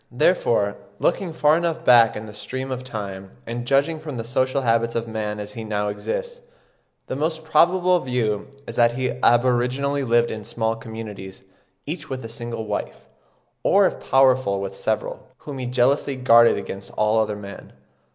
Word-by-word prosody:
Therefore, - - +2 0.2
looking 185 -4 0
far 150 -1 +3
enough 165 -1 -2
back 120 -2 +6
in 105 - -6
the 105 - -10
stream 130 +5 -5
of 130 0 -4
time, 100 -6 -7
and 120 +1 -5
judging 145 +4 +2
from 150 -4 -6
the 115 - -3
social 130 +3 0
habits 115 0 +1
of 115 0 -2
man 105 -2 -3
as 105 0 -7
he 115 - -6
now 105 -1 -1
exists, 480 - -4 0.6
the - - -4
most 160 +3 -2
probable 180 +3 +3
view 120 -7 -1 0.2
is - - -7
that 120 -1 +4
he 130 +1 -1
aboriginally 125 +4 +2
lived 120 -1 +2
in 110 -1 -6
small 110 +2 -1
communities, 110 -4 -9 0.4
each 160 +5 -5
with 130 -3 -5
a - - -6
single 115 -1 -5
wife, 105 -1 -5 0.5
or - - +4
if - - -1
powerful 130 -7 +4
with 100 0 -4
several, 110 +2 -3
whom 140 -3 -8
he 125 - -3
jealously 130 +3 +1
guarded 120 -2 +5
against 100 0 -7
all 105 +1 +3
other 105 -1 0
men. 100 -1 -10
120 Hz, 170 wpm, -23 LUFS, 110-140 Hz, 0.6 s, back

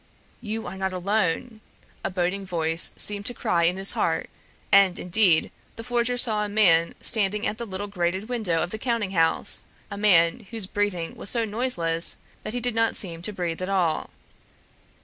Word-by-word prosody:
"You 220 -1 -4
are 180 +2 -7
not 190 0 -2
alone!" 210 +4 -1 0.4
a - - -1
boding 185 +1 -2
voice 165 -3 +1
seemed 205 0 0
to 245 - -2
cry 170 -5 +1
in 180 +2 +1
his 195 +1 +1
heart; - - -1 0.4
and 195 -2 +5
indeed 180 -2 +3 0.2
the 230 - -8
forger 245 0 0
saw 220 -4 +6
a 210 - -4
man 170 -6 +3
standing 210 0 +1
at 215 - -3
the 235 - -5
little 195 +1 -5
grated 190 0 -2
window 215 -10 -1
of 175 - -5
the 220 - -4
counting 230 -5 -2
house, 165 -3 +2 0.3
a 200 - -6
man 190 +1 +3
whose 225 -4 -3
breathing 190 -4 -2
was - - -4
so 230 -1 0
noiseless 190 -8 -1 0.2
that 215 - -6
he 245 - -2
did 245 0 -2
not 225 0 +1
seem 170 -4 -3
to 210 - -1
breathe 175 -3 -4
at 185 - -3
all. 175 -5 0
200 Hz, 185 wpm, -24 LUFS, 175-220 Hz, 0.4 s, saw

